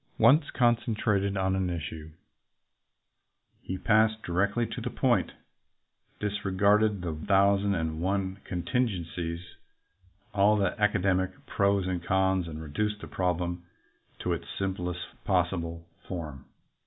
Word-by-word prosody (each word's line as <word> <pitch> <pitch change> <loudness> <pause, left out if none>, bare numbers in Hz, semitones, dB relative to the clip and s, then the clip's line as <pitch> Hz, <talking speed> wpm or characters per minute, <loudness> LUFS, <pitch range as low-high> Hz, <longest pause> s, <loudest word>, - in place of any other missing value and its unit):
Once 150 +2 +5
concentrated 110 -5 +1
on 95 0 +1
an 95 -1 0
issue, 80 -2 -5 1.5
he 95 - -4
passed 110 +2 +3
directly 100 +7 +1
to - - -6
the - - -2
point, - - +1 0.9
disregarded 105 0 +2
the 85 -2 -2
thousand 100 +4 +3
and 80 -2 -2
one 95 +1 -1
contingencies, 90 -5 -2 0.9
all 105 +1 +4
the 95 -3 +1
academic 95 -2 +1
pros 100 -1 +1
and 90 -2 -2
cons, 95 -1 +2
and 80 -1 -6
reduced 105 +8 -2
the - - -8
problem 90 -1 -1 0.5
to - - -1
its - - -5
simplest 90 -2 -2 0.2
possible 85 -3 0 0.2
form. 75 -7 -6
95 Hz, 115 wpm, -28 LUFS, 85-100 Hz, 1.5 s, Once